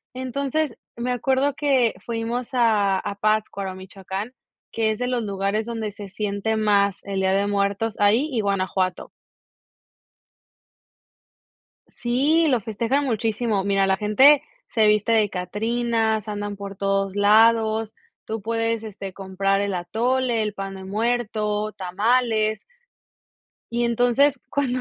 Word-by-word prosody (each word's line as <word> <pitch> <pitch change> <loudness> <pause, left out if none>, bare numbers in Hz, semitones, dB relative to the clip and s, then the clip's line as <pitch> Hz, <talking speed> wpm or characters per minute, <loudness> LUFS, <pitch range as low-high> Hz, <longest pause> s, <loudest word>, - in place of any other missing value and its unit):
Entonces 275 +2 -2 0.2
me 245 +2 -2
acuerdo 265 +3 +1
que 265 -6 +2
fuimos 235 +2 -3
a 210 -5 +3
a 200 +1 -4
Pátzcuaro, 200 -2 -1
Michoacán, 190 +4 -7 0.4
que 220 -1 +1
es 215 - -4
de 250 - -1
los 245 -2 -1
lugares 200 +2 -1
donde 225 -3 -4
se 200 -1 -10
siente 205 +2 -2
más 200 -2 +2
el 195 -1 -3
Día 190 0 +2
de 200 +1 +2
Muertos, 200 +2 0
ahí 220 +8 +3
y 235 - -1
Guanajuato. 190 -2 -1 2.8
Sí, 290 +7 +2
lo 250 -4 +2
festejan 230 +7 -1
muchísimo, 220 -3 0
mira, 195 -1 +2
la 190 0 +2
gente 260 +8 +5 0.3
se 220 -2 +2
viste 210 +2 +2
de 215 -3 +3
catrinas, 220 +3 -1
andan 205 -1 -4
por 200 0 -7
todos 195 0 0
lados, 220 +1 +3 0.3
tú 220 -2 -5
puedes, 225 0 -1
este, 200 -3 -7
comprar 195 +1 -1
el 200 -1 -1
atole, 235 +5 0
el 210 -1 -2
pan 195 -1 -6
de 190 0 -9
muerto, 215 0 -1
tamales 215 +3 0 1.1
y 240 0 0
entonces 245 +4 +3
cuando 255 -3 -1
215 Hz, 130 wpm, -23 LUFS, 200-240 Hz, 2.8 s, gente